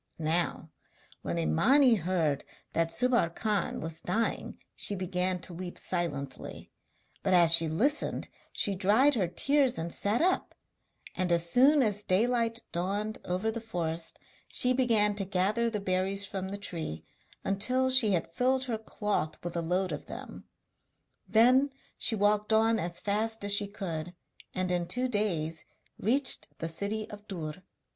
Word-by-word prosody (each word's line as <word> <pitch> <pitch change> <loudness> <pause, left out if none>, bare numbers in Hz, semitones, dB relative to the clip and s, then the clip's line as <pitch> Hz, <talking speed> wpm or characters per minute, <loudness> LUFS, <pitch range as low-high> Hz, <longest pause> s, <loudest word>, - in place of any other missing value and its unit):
Now 160 0 -1 0.5
when 85 - -3
Imani 240 - +4
heard 170 -7 0 0.3
that 165 0 +1
Subbar 245 -5 +2
Khan 210 -4 -1
was 160 0 -5
dying 225 +6 -2 0.2
she 205 - -1
began 185 0 -1
to 175 - -6
weep 175 +1 -7
silently; 145 -7 -3 0.5
but 185 - +2
as 170 -2 +6
she 165 -1 +7
listened 260 - 0 0.2
she 200 - -1
dried 210 +10 +3
her 200 -8 0
tears 275 +7 +2
and 165 +1 -4
sat 210 +4 0
up; 370 +2 0 0.6
and 180 -1 -1
as 170 0 +2
soon 270 - +5
as 210 -2 0
daylight 230 +4 +1
dawned 200 +5 -2
over 185 +5 -1
the 230 +1 -5
forest 170 -6 -3 0.3
she 250 0 +3
began 225 -5 +3
to 200 -1 -2
gather 195 +5 +1
the 215 -2 -3
berries 195 +1 0
from 190 -1 -5
the 200 - -5
tree 160 - -5 0.4
until 255 +7 +1
she 240 -6 +5
had 165 -1 -2
filled 260 +5 +1
her 235 -4 -3
cloth 210 -7 -3
with 175 0 -5
a 170 - 0
load 180 +2 0
of 150 - -5
them. - - -9 0.8
Then 250 +6 +5 0.3
she 225 - +2
walked 210 +1 +1
on 225 +1 +3
as 170 -1 -2
fast 215 0 -1
as 205 - +1
she 205 0 +2
could, 180 -4 -5 0.4
and 185 -1 -1
in 175 -1 0
two 250 +5 -1
days 170 -9 -1 0.4
reached 260 +6 +1
the 165 - -4
city 200 +6 -2
of 210 0 -11
Dûr. 165 -3 -6
200 Hz, 155 wpm, -29 LUFS, 170-225 Hz, 0.8 s, she